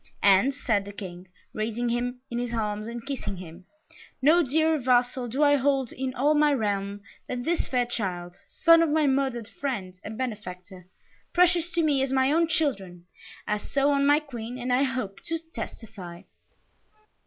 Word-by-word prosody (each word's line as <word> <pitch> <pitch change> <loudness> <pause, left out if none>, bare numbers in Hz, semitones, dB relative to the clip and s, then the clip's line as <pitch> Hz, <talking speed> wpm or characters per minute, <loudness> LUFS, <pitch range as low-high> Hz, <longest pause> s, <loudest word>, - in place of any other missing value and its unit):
"And," 200 +7 +5
said 220 -8 0
the 200 - -7
King, 185 -2 -8 0.3
raising 225 +2 -2
him 245 +1 -2
in 240 - -2
his 240 -1 -3
arms 210 -1 -2
and 235 0 -7
kissing 270 -8 -4
him, 175 0 -11 0.5
"no 310 +6 +5
dearer 315 +2 +2
vassal 250 0 +2
do 265 +6 0
I 290 0 +5
hold 270 -2 +1
in 260 0 -3
all 290 +4 +3
my 300 0 +4
realm 205 -4 -1 0.3
than 250 -1 -3
this 335 +4 0
fair 250 -2 +1
child, 180 -7 -4
son 330 0 +5
of 330 - +2
my 305 0 +2
murdered 265 -5 0
friend 200 -6 -5
and 215 +1 -7
benefactor 185 -7 -6 0.5
precious 350 -1 +4
to 335 - +2
me 290 -4 +2
as 270 -1 0
my 265 +1 +3
own 330 +2 +3
children, 195 - -2 0.4
as 210 0 -3
so 280 +1 +2
on 280 0 +2
my 290 +1 +5
Queen 245 -5 -7
and 250 0 -1
I 255 - +3
hope 255 -8 -2
to 330 -1 -1
testify." 225 - -9
245 Hz, 175 wpm, -26 LUFS, 205-285 Hz, 0.5 s, And